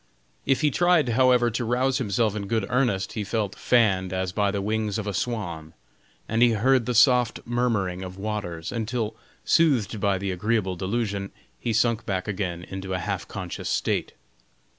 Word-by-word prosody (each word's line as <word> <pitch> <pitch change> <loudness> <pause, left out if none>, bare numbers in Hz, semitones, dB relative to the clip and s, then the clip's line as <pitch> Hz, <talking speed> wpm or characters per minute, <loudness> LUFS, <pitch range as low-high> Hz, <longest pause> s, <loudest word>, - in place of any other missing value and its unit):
If 135 +1 +2
he 150 -2 +3
tried, 175 -4 +3
however, 125 0 +4
to 120 +3 -2
rouse 125 +3 +1
himself 110 -2 0
in 100 -2 -4
good 110 -1 0
earnest 120 -7 +1
he 110 - -2
felt 105 -1 -2
fanned 100 -7 +2
as 95 -1 -2
by 100 +1 +1
the 100 0 -2
wings 105 +1 -1
of 110 - -3
a 100 - -3
swan, 85 -10 -3 0.5
and 115 +1 0
he 120 -1 +6
heard 125 +3 +2
the 125 - -1
soft 125 0 +4
murmuring 115 -7 0
of 95 0 -7
waters, 95 -5 -4
until 115 -1 -2 0.3
soothed 125 - +3
by 100 -1 +1
the 95 +1 -3
agreeable 95 0 0
delusion, 100 +1 -2 0.3
he 120 - -2
sunk 115 0 +2
back 95 -3 -2
again 90 -4 -3
into 95 0 -5
a - - 0
half 95 +1 -3
conscious 90 -4 -5
state. - - -1
105 Hz, 175 wpm, -25 LUFS, 95-120 Hz, 0.5 s, he